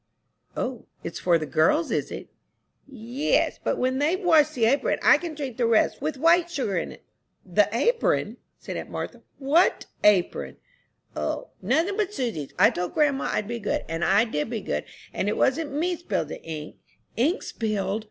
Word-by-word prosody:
"O, 250 -2 -4 0.2
it's 165 - -5
for 175 -2 +3
the 155 - -4
girls, 230 - +2
is - - -1
it?" - - -7 0.6
"Yes, 255 +2 -1
but - - 0
when 260 +1 0
they've 320 +6 +1
washed 315 -5 +4
the 235 -3 +2
apron 270 +6 +2
I - - +6
can 335 -3 -6
drink 275 -6 -5
the 240 -2 +2
rest 230 +2 +2
with 300 -1 -2
white 335 +4 +4
sugar 260 - -2
in." 170 - -3 0.5
"The 200 +2 +3
apron!" 475 - +1 0.2
said - - -6
aunt - - -6
Martha, - - -6 0.2
"what 300 +6 +2 0.2
apron?" 200 -4 +2 0.6
"O, - - -3
nothing 375 +6 +1
but 415 -1 -1
Susy's. 180 - -3
I - - +6
told 180 0 -4
grandma 290 -3 +2
I'd 210 - -1
be 235 +1 -4
good, 210 - -2
and 165 +1 -3
I 200 +5 +4
did 150 -5 -2
be 230 -3 -3
good; 75 - -3 0.3
it 205 +3 -1
wasn't 290 +3 +1
me 340 +5 0
spilled 345 - -3
the - - -7
ink." 155 -2 -7 0.4
"Ink 310 - +1
spilled?" 215 -2 -2
255 Hz, 175 wpm, -25 LUFS, 205-315 Hz, 0.6 s, I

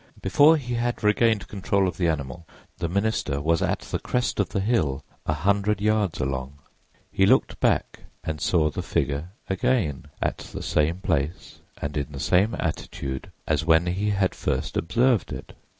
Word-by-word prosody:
Before 155 +3 +5
he 125 -4 -4
had 120 -1 -1
regained 105 0 +3
control 100 -1 0
of 90 - -4
the 90 - +1
animal 80 0 -3 0.3
the 85 - -1
minister 100 -7 0
was 80 +3 +1
at - - 0
the - - -4
crest 125 -3 -1
of 100 - +1
the - - -1
hill 80 - 0 0.2
a 75 - +2
hundred 100 +5 +1
yards 105 -4 +1
along. 65 +1 -3 0.5
He 95 - +3
looked 130 +5 +3
back - - +1 0.2
and 80 -2 -4
saw 80 -4 +2
the - - -3
figure 70 +5 -1 0.2
again, 95 - 0
at - - -1
the - - -7
same 80 +5 +1
place 80 -3 -2 0.2
and 70 0 -4
in 75 0 -3
the 70 - -6
same 95 - +2
attitude 70 -4 -4
as 80 -1 +1
when 80 +1 +4
he 95 +4 0
had 95 -2 +1
first - - -2
observed 120 +4 +2
it. - - -7
90 Hz, 170 wpm, -25 LUFS, 75-105 Hz, 0.5 s, Before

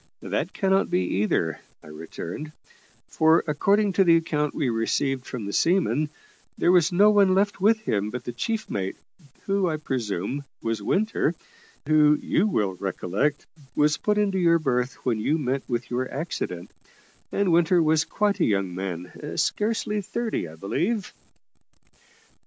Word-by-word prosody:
"That - - -2
cannot 195 0 +1
be, 90 - +1 0.2
either," 80 -6 0 0.2
I - - -14
returned; 85 - -7 0.5
"for 160 +1 +3
according 195 +7 +2
to 195 - +4
the 170 -2 +5
account 150 -2 -1
we 145 - 0
received 125 +3 -1
from 120 -5 -5
the 100 - -5
seaman, 155 - +2 0.5
there 175 - +3
was 180 -1 +4
no 205 +4 +5
one 200 -3 +4
left 200 0 +1
with 215 +2 +4
him 105 - -1
but 125 +2 -6
the 120 - -5
chief 220 - -3
mate, 95 -1 -3 0.5
who, 195 -2 +1
I 155 - -1
presume, 130 - -3 0.2
was 115 -1 -2
Winter 220 +3 0 0.5
who, 150 -1 +5
you 200 - +1
will 105 - 0
recollect, 100 +9 -1 0.3
was 150 0 +3
put 210 0 0
into 200 -2 +1
your 170 -1 +4
berth 125 -4 -1
when 120 -4 +1
you 150 +9 +1
met 135 -2 -1
with 120 0 -3
your 130 +1 -2
accident; 115 - -4 0.6
and 200 -3 +1
Winter 175 +1 +4
was 160 -1 +3
quite 205 +4 0
a - - +3
young 100 -3 0
man 90 -1 -6
scarcely 210 -1 0
thirty, 225 - -3
I 80 - -11
believe." 185 - -2
150 Hz, 155 wpm, -25 LUFS, -, 0.6 s, the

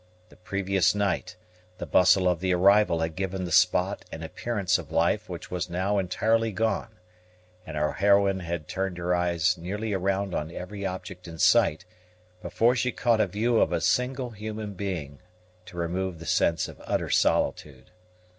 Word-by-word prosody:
The - - -18
previous 95 0 0
night, 100 -2 -1 0.4
the - - -5
bustle 90 0 +4
of 90 -2 +1
the 90 0 +1
arrival 100 -2 +4
had 80 -1 -2
given 95 -1 -3
the 90 - -6
spot 90 +2 +2
an 80 - -7
appearance 100 +2 -1
of - - -10
life 85 +6 +1
which 90 -1 -8
was 90 0 -3
now 95 +4 0
entirely 110 +4 +1
gone; 110 +1 -2 0.7
and 80 -1 -6
our 75 0 +1
heroine 100 -1 +3
had 85 -3 -5
turned 95 -2 -3
her 90 +1 -1
eyes 90 0 +1
nearly 105 +5 -4
around 95 0 -1
on 75 +1 -2
every 100 +3 -5
object 90 -1 -7
in 80 -1 -9
sight, 80 -1 +3 0.6
before 120 +6 +2
she 125 +1 0
caught 115 -3 +2
a 105 - +2
view 110 +5 +1
of - - +2
a - - 0
single 125 0 0
human 105 -1 -6
being 90 -8 -5 0.5
to 85 - -12
remove 90 +1 -2
the 85 - -10
sense 85 -1 +1
of - - -12
utter - - -1
solitude. 70 +2 0
95 Hz, 170 wpm, -26 LUFS, 85-105 Hz, 0.7 s, bustle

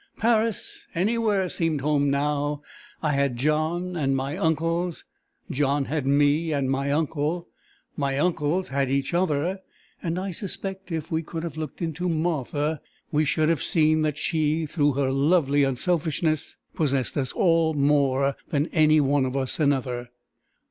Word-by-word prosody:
Paris, 225 -1 0
anywhere 205 0 +1
seemed 165 -4 0
home 145 0 +2
now! 145 +1 0 0.4
I 155 - +2
had 140 -3 +1
John 155 +6 0
and 135 -4 +1
my 135 +3 -2
uncles; 165 0 -1 0.5
John 140 0 +1
had 145 -2 -2
me 145 +3 +3
and 140 -3 0
my 140 +1 0
uncle; 160 +3 -1 0.5
my 140 -2 -1
uncles 165 +2 0
had 135 0 0
each 135 +3 -1
other; 175 +1 0 0.4
and 170 0 -2
I 190 +1 -3
suspect, 195 -1 -5
if 160 -1 -4
we 160 0 +1
could 165 0 -6
have 165 -4 -5
looked 155 +2 -5
into 170 +2 -2
Martha, 155 -2 -1 0.3
we 155 +1 +2
should 155 +2 +1
have 165 - +1
seen 155 -1 +3
that 150 -2 0
she, 155 0 0
through 145 -1 +1
her 135 0 0
lovely 145 0 +3
unselfishness, 155 +2 0 0.2
possessed 135 -5 0
us 130 -3 -1
all 165 -3 +2
more 140 -1 +2
than 150 +2 0
any 155 -1 +5
one 140 -1 +2
of 130 +2 -3
us 130 +2 -1
another. 130 -4 0
150 Hz, 150 wpm, -25 LUFS, 140-165 Hz, 0.5 s, any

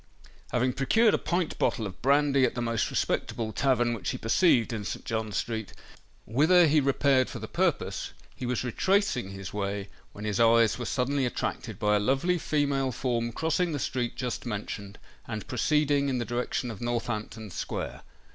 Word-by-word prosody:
Having 125 +1 +1
procured 210 - +3
a - - +2
pint 175 -2 -1
bottle 110 - +1
of 95 -3 -8
brandy 140 0 +3
at - - +2
the 120 - -2
most 115 -1 0
respectable 110 -2 -1
tavern 120 0 +2
which 115 - -3
he - - -2
perceived 120 - +3
in 110 -2 -3
St. - - -5
John 110 -2 -2
Street, 110 +2 -3 0.5
whither 160 - +5
he 155 0 +4
repaired 135 -1 +3
for - - -6
the - - -6
purpose, - - -1 0.2
he 125 - -5
was 125 0 -1
retracing 185 - +1
his 95 -1 -7
way, 100 -1 -3 0.2
when 105 - -8
his 105 -2 -1
eyes 115 0 +4
were 120 - -3
suddenly 130 +3 0
attracted - - -4
by 105 -2 +2
a - - +3
lovely 135 - +1
female 140 -4 0
form 120 -2 -1
crossing 165 +5 0
the - - -1
street 125 -3 -2
just 125 -2 -3
mentioned, 100 -2 -5 0.3
and 110 -4 -5
proceeding 145 +2 +1
in 130 - 0
the 120 - -2
direction 120 +1 -2
of 105 - -9
Northampton 115 -3 -3
Square. - - -4
120 Hz, 175 wpm, -28 LUFS, 110-140 Hz, 0.5 s, whither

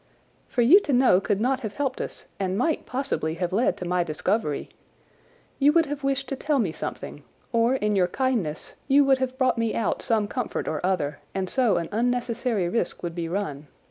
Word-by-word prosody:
"For 245 - +1
you 320 - +8
to 295 -8 -2
know 245 -7 +5
could 200 0 0
not 255 +4 +1
have 215 -5 -6
helped 275 -3 -2
us - - -7
and 190 -1 -1
might 310 +7 0
possibly 250 - -2
have 175 +1 -2
led 230 +6 +2
to 180 - -5
my 180 0 +1
discovery. 155 0 -1 0.9
You 285 +1 +5
would 330 0 +4
have 285 -1 -5
wished 275 0 0
to 275 - -2
tell 295 +2 0
me 205 -10 +1
something, - - -6 0.3
or 235 +2 +3
in 210 -5 0
your 185 -2 +3
kindness 215 - -2
you 280 +1 +5
would 270 -1 +4
have 260 0 -2
brought 255 -3 +2
me 230 -1 0
out 230 - -1
some 220 -3 +1
comfort 250 +3 -3
or 155 0 -2
other, 150 -6 0 0.2
and 190 -1 -1
so 235 -4 +2
an 170 -1 -2
unnecessary 235 -3 0
risk 180 -2 -2
would 170 -1 -3
be 165 -1 -4
run. 150 -6 -3
230 Hz, 205 wpm, -25 LUFS, 180-260 Hz, 0.9 s, you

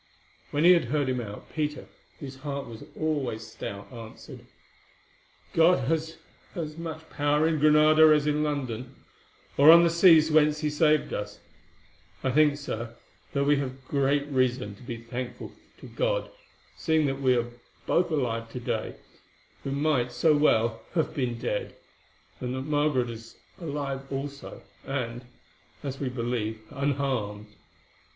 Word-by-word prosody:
When 145 +2 0
he 175 - +8
had 170 -5 +4
heard 140 +2 0
him 125 -1 -1
out, 105 -2 -9
Peter, 150 -1 -2 0.3
whose 135 -2 -8
heart 140 0 -5
was 115 -1 -10 0.2
always 135 -8 -2
stout, 100 -2 -8
answered: 115 -2 -11 1.1
"God 165 -5 +4
has 160 +1 -1 0.4
as 155 -3 -4
much 160 -1 -7
power 145 +1 +2
in 160 -2 0
Granada 155 +1 +6
as 150 -1 +4
in 150 0 +1
London, 130 -4 -3 0.6
or 145 +2 +7
on 170 +1 +10
the 170 - +3
seas 165 -2 +6
whence 150 0 +4
He 150 - 0
has 150 - -7
saved 155 -1 +3
us. 105 0 -5 0.8
I 130 - +1
think, 150 +1 +4
Sir, 115 -5 -5 0.4
that 140 - +1
we 145 +1 +3
have 135 -1 -5
great 140 +1 +1
reason 130 -6 0
to 100 - -17
be 120 -2 -6
thankful 120 +1 -6 0.3
to - - -10
God, - - -1 0.4
seeing 160 -2 +1
that 135 0 -2
we 130 -2 +3
are 120 0 -2 0.3
both 175 - +2
alive 115 -7 -1
to 125 - -4
day, 120 - -3 0.7
who - - -4
might 140 -3 +1
so 150 +6 +3
well 115 -6 +2
have 160 - 0
been 125 -6 -2
dead, 105 - -3 0.6
and 125 0 -3
that 130 - -3
Margaret 145 -4 +1
is 115 0 -11 0.2
alive 140 -4 -4
also, 140 +1 -6 0.2
and, 125 -2 -4 0.6
as 135 -1 -5
we 135 - -2
believe, 115 -3 -3
unharmed. 130 -7 -2
140 Hz, 150 wpm, -27 LUFS, 125-150 Hz, 1.1 s, on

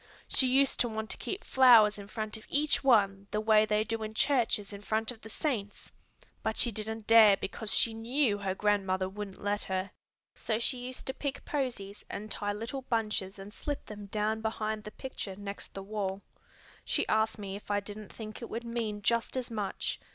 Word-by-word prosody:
She 260 - +2
used 270 +2 +3
to 240 - +3
want 220 0 -3
to - - -2
keep 390 - -4
flowers 230 -5 +7
in 200 - -8
front 215 0 -4
of 220 - -11
each 295 +1 +2
one 200 -6 +4
the 210 - -1
way 215 0 +5
they 210 0 +2
do 225 0 -3
in 220 0 -5
churches 225 -6 +2
in 200 - -8
front 220 +3 -1
of 230 -2 -12
the 220 - -10
saints; 215 -6 -3 0.5
but 220 0 -1
she 240 - +3
didn't 220 +1 -4
dare 220 -3 +8
because 215 +2 -4
she 230 - +3
knew 230 -1 +1
her 190 -2 -2
grandmother 190 -2 +1
wouldn't 195 0 -7
let 205 0 0
her. 190 0 -2 0.4
So 220 - -1
she 245 +2 +1
used 255 - -6
to 265 - -2
pick 280 0 -4
posies 235 -8 -3
and 215 +1 -6
tie 205 0 -1
little 230 +6 -4
bunches 215 -5 -1
and 195 +2 -9
slip 290 +3 -4
them 205 -1 -8
down 215 +2 0
behind 220 -1 -2
the - - -5
picture 225 -6 -6
next 200 0 -7
the 195 - -5
wall. 200 -1 -3 0.6
She - - +1
asked 220 0 +2
me 200 -2 -5
if 205 - -10
I 205 0 +2
didn't 205 0 -8
think 215 0 -8
it 235 - -6
would 230 +1 -4
mean 225 -3 -3
just 235 +3 +1
as 250 -2 -3
much. 210 -4 -2
215 Hz, 205 wpm, -31 LUFS, 205-230 Hz, 0.6 s, dare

